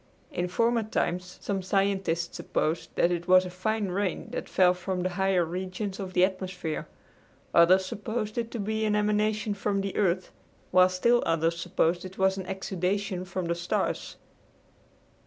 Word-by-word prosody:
In 180 -11 -1
former 230 +5 +2
times 180 -4 -2
some 195 -2 -2
scientists 190 -3 0
supposed 160 +2 -1
that 170 - +3
it 175 0 -2
was 185 0 +6
a 180 - -6
fine 205 +3 -1
rain 190 +1 -2
that - - -5
fell 180 -1 +4
from 180 0 -3
the 185 - 0
higher 190 -2 +2
regions 185 +3 -4
of 190 -2 -5
the 180 - +5
atmosphere. 185 -4 -4 0.7
Others 185 +3 +6
supposed 215 +2 -4
it 230 -1 -3
to 235 - -5
be 220 +2 -1
an 210 -1 +2
emanation 210 +1 +1
from 200 0 -1
the 195 0 -4
earth, 185 -2 +1 0.4
while 185 0 +6
still 235 +7 +3
others 165 +1 +1
supposed 175 0 +1
it 185 0 -9
was 190 0 +3
an 190 -1 -6
exudation 190 0 -2
from 185 0 -3
the 170 - 0
stars. 170 +1 -2
185 Hz, 165 wpm, -28 LUFS, 180-205 Hz, 0.7 s, was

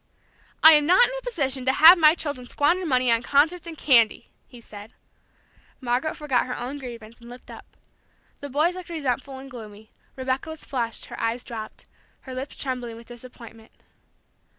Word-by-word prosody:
"I 315 - +11
am 300 -1 +3
not 370 +8 +6
in - - -6
a - - -6
position 275 - -3
to 265 - +2
have 325 +6 +9
my 315 -2 +5
children 285 -7 -4
squander 340 +7 0
money 255 -3 +2
on 230 0 +3
concerts 310 +7 +1
and 325 -2 -8
candy," 235 -8 +2 0.2
he 245 - -14
said. 210 -1 -13 0.8
Margaret 255 +4 -2
forgot 275 -5 -1
her 250 - -5
own 260 +4 -6
grievance, 235 -3 -10
and 235 - -13
looked 245 +1 -13
up. - - -14 0.6
The 285 - -8
boys 305 +6 +1
looked 365 -2 -9
resentful 270 -4 -3
and 265 +1 -11
gloomy; 215 -3 -12 0.2
Rebecca 260 +4 -3
was 315 -1 -9
flushed, 235 -4 -4
her - - -9
eyes 230 +2 -2
dropped, 220 -2 -9 0.4
her 260 - -10
lips 260 +2 -6
trembling 250 -4 -5
with 230 +1 -15
disappointment. 235 -2 -13
260 Hz, 175 wpm, -24 LUFS, 240-300 Hz, 0.8 s, I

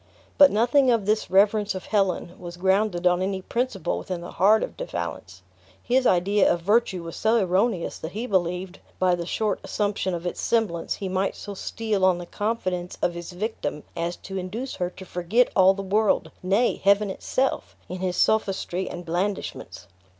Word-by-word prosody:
But 285 -1 +9
nothing 245 +5 +3
of 230 -5 +2
this 215 -1 0
reverence 205 +2 +3
of 185 - -6
Helen 195 -4 0
was 175 -1 -8
grounded 190 0 +1
on 180 0 +3
any 190 0 -1
principle 240 -4 -2
within 180 -2 -5
the 175 - -8
heart 210 +3 +4
of - - -5
De - - -5
Valence. - - -6 0.4
His 255 +1 +2
idea 190 +3 +3
of 175 - -1
virtue 200 -2 +1
was 165 0 -7
so 220 +2 +2
erroneous 190 -1 0
that 160 - -7
he 220 +4 -3
believed, 180 -2 -1 0.2
by 185 -1 +3
the 170 -1 -3
short 215 +1 -1
assumption 200 -3 -1
of 170 +1 -6
its 175 - -3
semblance, 215 -8 0
he 195 - -5
might 190 +1 -1
so 205 - -7
steal 210 0 -2
on 185 -2 +4
the 175 - -7
confidence 185 -3 -3
of 175 - +2
his 170 0 -7
victim 180 -6 -4
as 170 +1 -2
to 195 0 -6
induce 220 +9 -5
her 180 -2 -1
to 190 +1 -12
forget 180 +8 +1
all 190 0 +6
the 195 - -5
world 210 +2 +1
nay, 200 +7 +1
heaven 200 +1 +4
itself 260 +7 -2
in 185 +1 -6
his 180 -1 -2
sophistry 190 -3 +1
and 175 0 -7
blandishments. 185 +4 -3
190 Hz, 185 wpm, -25 LUFS, 180-215 Hz, 0.4 s, But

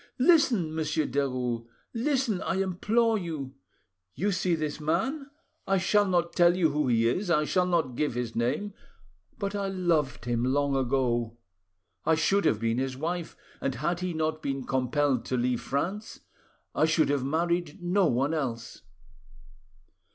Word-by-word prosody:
Listen, 250 - +3
Monsieur 155 -1 0
Derues, 125 -5 -2 0.3
listen, 250 -5 0
I - - -1
implore 215 +4 +1
you! 155 -7 -5 0.6
You 205 +2 0
see 180 -2 +1
this 155 -1 -3
man, 265 - -1 0.4
I 195 0 +3
shall 205 +2 +3
not 175 -2 +1
tell 175 0 +4
you 165 -4 +3
who 150 -1 0
he 115 -2 +3
is, 180 - -1
I 150 -3 +3
shall 180 +3 +1
not 165 -8 +1
give 145 -2 -1
his 120 -2 -3
name... 125 - -1 0.6
but 200 0 -3
I 200 -1 -2
loved 165 -11 0
him 120 -1 0
long 140 +2 +1
ago; 120 -3 0 0.7
I 160 - +3
should 195 +6 +2
have 105 - +2
been 115 +1 0
his 130 -1 -2
wife, 170 +3 -4 0.2
and 135 -1 -1
had 160 +7 -1
he 180 -2 -3
not 155 0 -1
been 135 -1 -3
compelled 130 0 0
to 130 - -1
leave 125 0 0
France, 190 +10 -3 0.5
I - - +3
should 160 -1 +2
have 140 -2 +1
married 170 +3 -1
no 180 +1 +2
one 135 +4 +1
else. 115 -7 -4
155 Hz, 160 wpm, -28 LUFS, 130-185 Hz, 0.7 s, tell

